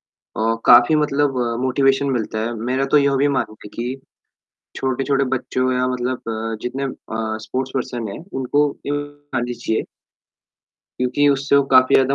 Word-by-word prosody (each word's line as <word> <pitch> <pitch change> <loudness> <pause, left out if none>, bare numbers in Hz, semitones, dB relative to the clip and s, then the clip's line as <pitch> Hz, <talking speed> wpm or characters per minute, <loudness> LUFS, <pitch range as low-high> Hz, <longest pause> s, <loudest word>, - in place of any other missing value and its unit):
अ, 115 +2 -2
काफ़ी 120 +5 +7
मतलब 145 -3 +1 0.2
मोटिवेशन 135 +1 +2
मिलता 115 -3 -2
है। 120 - -3
मेरा 125 +4 -1
तो - - +8
यह 140 -1 +2
भी 140 +2 +3
मानना 130 -5 -1
है - - -8
कि 125 +3 -3 0.8
छोटे-छोटे 135 +1 0
बच्चों 130 +1 -1
या 125 0 +1
मतलब 125 0 -2
अ, 115 0 -3
जितने 130 +3 -3
अ, 110 -4 -4
स्पोर्ट्स 130 +1 -3
पर्सन 120 -3 -3
है 100 - -6 0.2
उनको 145 +3 +1 0.2
ये 145 - -2
दिखानी 145 -4 -5
चाहिए। 110 -2 -2 1.2
क्यूँकि 125 +3 +2
उससे 140 0 +2
वो 140 - +5
काफ़ी 130 0 +6
ज़्यादा 135 +1 +4
130 Hz, 160 wpm, -20 LUFS, 120-140 Hz, 1.2 s, तो